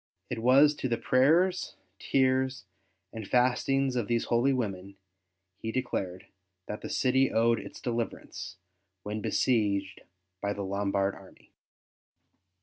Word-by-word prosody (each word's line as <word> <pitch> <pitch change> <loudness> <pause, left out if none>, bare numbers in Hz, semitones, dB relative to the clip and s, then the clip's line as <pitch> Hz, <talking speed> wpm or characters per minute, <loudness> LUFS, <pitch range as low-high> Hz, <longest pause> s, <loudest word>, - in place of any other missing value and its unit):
It 120 - -2
was 135 +5 +6
to 130 - -2
the 115 - 0
prayers, 165 +11 +2 0.2
tears, 130 -3 +1 0.5
and 110 -3 -7
fastings 130 +2 +2
of 120 -4 -1
these 120 -1 +1
holy 120 +4 +2
women, 100 -6 -3 0.6
he 110 - -4
declared, 95 -8 -3 0.4
that 105 - -6
the - - -6
city 130 0 +2
owed 115 0 +3
its 100 - -10
deliverance, 115 -5 -4 0.5
when 105 +1 -4
besieged 100 -7 0 0.4
by 100 0 -1
the 100 - -5
Lombard 100 0 0
army. 95 -1 -16
115 Hz, 125 wpm, -29 LUFS, 100-130 Hz, 0.6 s, was